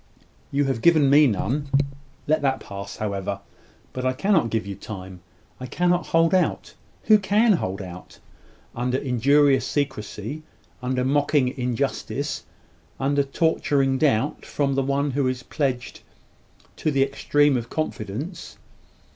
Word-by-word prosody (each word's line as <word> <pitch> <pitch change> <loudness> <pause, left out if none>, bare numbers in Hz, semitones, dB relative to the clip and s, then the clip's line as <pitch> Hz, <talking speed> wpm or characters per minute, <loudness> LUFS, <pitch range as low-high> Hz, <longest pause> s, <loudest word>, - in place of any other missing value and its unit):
"You 140 +1 +2
have 135 -4 -1
given 155 -5 +5
me 145 +1 +7
none. 130 +6 -1 0.6
Let 155 0 +2
that 135 -2 +1
pass, 100 -1 -8
however. 100 -2 -3 0.5
But 130 - -4
I 130 0 +1
cannot 160 - +2
give 110 -2 -1
you 100 - -5
time. 95 -2 -9 0.4
I 130 - -6
cannot 175 +5 +1
hold 165 +1 +3
out 185 - +1 0.3
who 215 -1 +6
can 210 +3 +3
hold 95 - -2
out, 90 0 -10 0.6
under 125 +2 0
injurious 135 +2 +3
secrecy 130 -1 -3 0.4
under 125 0 -1
mocking 140 -1 +2
injustice 135 +3 -2 0.5
under 140 +1 +2
torturing 140 -2 +1
doubt 140 -2 +1
from 140 -2 -1
the 135 - +1
one 140 +1 0
who 135 0 0
is 130 0 -2
pledged 130 -4 -3 0.8
to - - 0
the 135 -2 +3
extreme 145 +1 +2
of 120 -1 -3
confidence? 155 - -5
135 Hz, 135 wpm, -24 LUFS, 125-145 Hz, 0.8 s, me